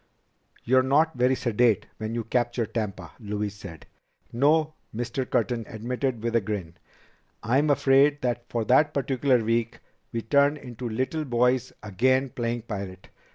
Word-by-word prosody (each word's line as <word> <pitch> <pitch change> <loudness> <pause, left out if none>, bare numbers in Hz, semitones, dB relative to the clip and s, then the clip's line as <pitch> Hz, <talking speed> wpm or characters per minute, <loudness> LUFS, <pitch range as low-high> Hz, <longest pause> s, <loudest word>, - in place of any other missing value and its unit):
"You're 130 +2 +4
not 145 +5 +2
very 125 +1 +3
sedate 120 -4 +2
when 110 +1 -4
you 120 - -2
capture 120 0 0
Tampa," 105 -6 -4
Louise 105 -2 -3
said. 95 -6 -11 0.5
"No," 155 +5 +3 0.2
Mr. 120 +2 -3
Curtin 115 0 0
admitted 120 +1 -3
with 115 0 -1
a 115 - +4
grin, 95 -5 -4 0.7
"I'm 135 +7 +2
afraid 140 +1 +4
that 120 -1 -2
for 115 -2 -2
that 145 +5 +3
particular 130 -3 +1
week 115 +1 0 0.3
we 115 -1 -3
turn 140 +5 +3
into 125 -3 -7
little 130 +8 -2
boys 125 -1 +1
again 130 +6 +1
playing 120 -3 -3
pirate. 100 -4 -7
120 Hz, 145 wpm, -26 LUFS, 110-130 Hz, 0.7 s, You're